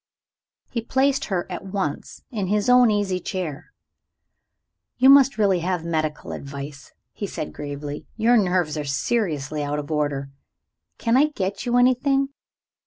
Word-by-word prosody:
He 235 - -2
placed 270 +3 +1
her 185 -4 -1
at 180 -2 -6
once 190 -6 -4
in 205 -6 -2
his 210 +4 +1
own 250 -1 +7
easy 205 -3 0
chair. 180 - -5 1.3
"You 265 +2 +7
must 275 -2 +6
really 195 -4 +3
have 175 -1 -2
medical 155 -2 -2
advice," 140 0 -8 0.2
he - - -5
said 75 - -5
gravely; 145 0 -6
"your 230 +2 +4
nerves 180 -7 +1
are - - -2
seriously 150 - -1
out 145 0 -2
of 150 +1 -5
order. 145 -2 -1 0.7
Can 230 0 +1
I 285 - +6
get 195 -7 -4
you 240 0 +2
anything?" 270 +2 +3
185 Hz, 145 wpm, -23 LUFS, 150-240 Hz, 1.3 s, own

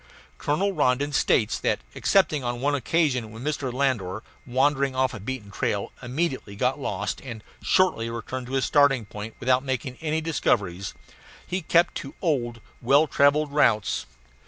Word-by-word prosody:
Colonel 185 +8 +1
Rondon 145 -2 +1
states 115 -5 +2
that - - +1 0.2
excepting 155 -8 +2
on 120 0 -2
one 145 +3 +1
occasion, 140 -4 +1
when 110 +2 -9
Mr. 145 -3 -2
Landor, 115 -7 -1 0.2
wandering 135 +1 +2
off 130 0 +1
a 110 - -6
beaten 105 -1 -6
trail, - - -2
immediately 130 -5 -2
got 125 +7 0
lost 105 -6 -3
and 120 -5 -8 0.2
shortly 180 -12 +2
returned 120 +2 -5
to 130 - -7
his 135 -1 +1
starting 145 -5 +4
point 105 +2 -8
without 130 +1 +2
making 130 -1 -3
any 160 0 0
discoveries 100 - -1 0.5
he 185 +1 -2
kept 170 +1 +3
to 135 - -8
old, 120 - -1 0.2
well 140 +6 +5
travelled 145 +1 +3
routes. 110 -8 +2
130 Hz, 155 wpm, -25 LUFS, 115-145 Hz, 0.5 s, well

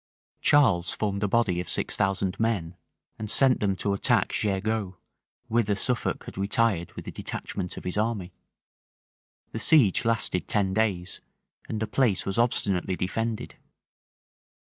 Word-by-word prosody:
Charles 95 -12 +3
formed 100 -2 -2
a 105 - +1
body 100 -5 +1
of 90 - -4
six - - 0
thousand 95 -1 -1
men, 100 -7 -1 0.4
and 105 -1 -5
sent 130 +2 +4
them 100 -2 0
to 100 +2 -1
attack 100 - +2
Jergeau, 100 -1 -1 0.5
whither 110 -3 +1
Suffolk 125 +4 +1
had - - -9
retired 100 -3 +1
with - - -9
a - - -4
detachment 90 -2 -4
of - - -7
his 90 +2 -3
army. 105 -5 -2 1.2
The - - -4
siege 125 - +5
lasted 115 -5 +1
ten 100 -3 +1
days; 95 -4 -1 0.5
and 110 - -3
the 110 - -1
place 115 -4 0
was 95 +3 -2
obstinately 100 -6 +1
defended. 115 +5 -3
100 Hz, 140 wpm, -26 LUFS, 95-115 Hz, 1.2 s, siege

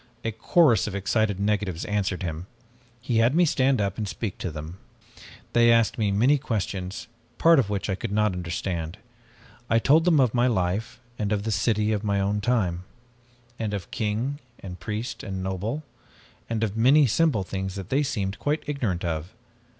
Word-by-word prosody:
"A 115 - 0
chorus 115 +3 +3
of 100 - -4
excited 100 0 0
negatives 100 -4 -1
answered 100 -2 -1
him. 85 +1 -4 0.5
He 115 -1 -1
had 120 +5 +3
me 175 +1 +5
stand 135 -4 +2
up 100 0 -1
and 105 - -2
speak 100 0 -5
to 90 - -3
them. 80 +4 -8 0.7
They 120 0 +5
asked 115 -2 +3
me 105 -2 +2
many 125 +9 +3
questions, 100 -7 -3 0.3
part 165 -1 +6
of 110 -6 0
which 100 -2 -2
I 95 - 0
could 100 +3 -4
not 105 -1 +2
understand. 85 0 -4 0.7
I 115 - +4
told 150 +8 +4
them 165 -4 +4
of 125 -4 +3
my 125 0 +3
life, 110 +2 -1 0.2
and 105 -1 -1
of 105 -1 0
the 110 - -2
city 105 +1 +1
of 105 -1 -1
my 100 -2 +1
own 100 +1 0
time, 95 -7 0 0.8
and 105 -2 -2
of 90 -4 -7
king 115 +5 -2 0.2
and 90 -2 -8
priest 110 +5 -4
and 95 -2 -5
noble, 100 +10 -3 0.7
and 115 -1 -1
of 105 -2 -1
many 135 +6 +5
simple 135 -3 +2
things 95 0 -4
that 95 -3 -7
they 140 +2 +2
seemed 100 -8 -2
quite 150 +1 -1
ignorant 115 -12 -2
of. 80 0 -3
105 Hz, 180 wpm, -25 LUFS, 95-120 Hz, 0.8 s, part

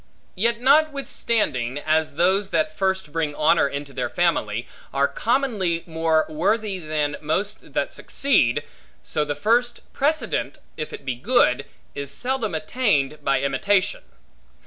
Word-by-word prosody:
Yet 230 +4 +1
notwithstanding, 245 - +1
as 155 0 0
those 190 +4 +2
that 155 -2 0
first 190 -3 -1
bring 155 -2 -1
honor 155 0 +4
into 140 0 -6
their 125 -1 -2
family, 120 -11 0 0.2
are 140 +1 +2
commonly 215 -9 0
more 160 -1 +1
worthy 205 +5 0
than 155 -2 -2
most 195 +8 -3
that - - 0
succeed, 145 - +1 0.4
so 150 - -1
the 145 -1 -3
first 235 +9 +1
precedent 310 +3 0 0.2
(if 155 - -5
it 140 - -9
be 130 - -1
good) 135 - +2 0.3
is 140 -1 -5
seldom 240 - -2
attained 155 - 0
by 135 -2 +2
imitation. 185 +9 +1
165 Hz, 130 wpm, -23 LUFS, 145-220 Hz, 0.4 s, honor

